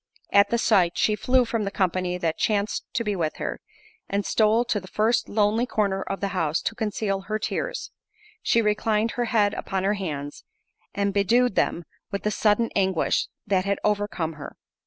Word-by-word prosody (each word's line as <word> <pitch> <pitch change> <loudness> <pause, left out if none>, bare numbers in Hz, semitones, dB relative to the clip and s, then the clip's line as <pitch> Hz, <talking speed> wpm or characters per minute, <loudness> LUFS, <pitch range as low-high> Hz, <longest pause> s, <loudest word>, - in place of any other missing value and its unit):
At 200 0 +5
the 235 - +1
sight, 190 -7 +3
she 215 - +2
flew 250 +4 +2
from 230 -1 -1
the 200 - -1
company 185 -2 0
that 165 -3 -2
chanced 210 -1 0
to 230 - +1
be 210 -2 -1
with 160 -4 -1
her, - - -4 0.5
and 200 0 -1
stole 220 +2 +3
to 220 -3 0
the 190 - -12
first 220 +5 +1
lonely 215 +3 +2
corner 200 -4 0
of 195 0 -4
the 200 - 0
house 165 -4 0
to - - -1
conceal 210 -3 -2
her 215 0 0
tears—she 430 - -3
reclined 215 +1 +1
her 245 - -1
head 210 -3 +2
upon 190 -1 -3
her 200 +2 +2
hands, 150 -8 -5 0.5
and 200 0 0
bedewed 230 +5 +3
them 175 - 0 0.3
with 200 -2 -4
the 210 - 0
sudden 215 +2 +2
anguish, 190 -4 +1 0.2
that 190 -2 +1
had 200 0 0
overcome 205 -6 -1
her. - - -8
205 Hz, 180 wpm, -25 LUFS, 190-225 Hz, 0.5 s, At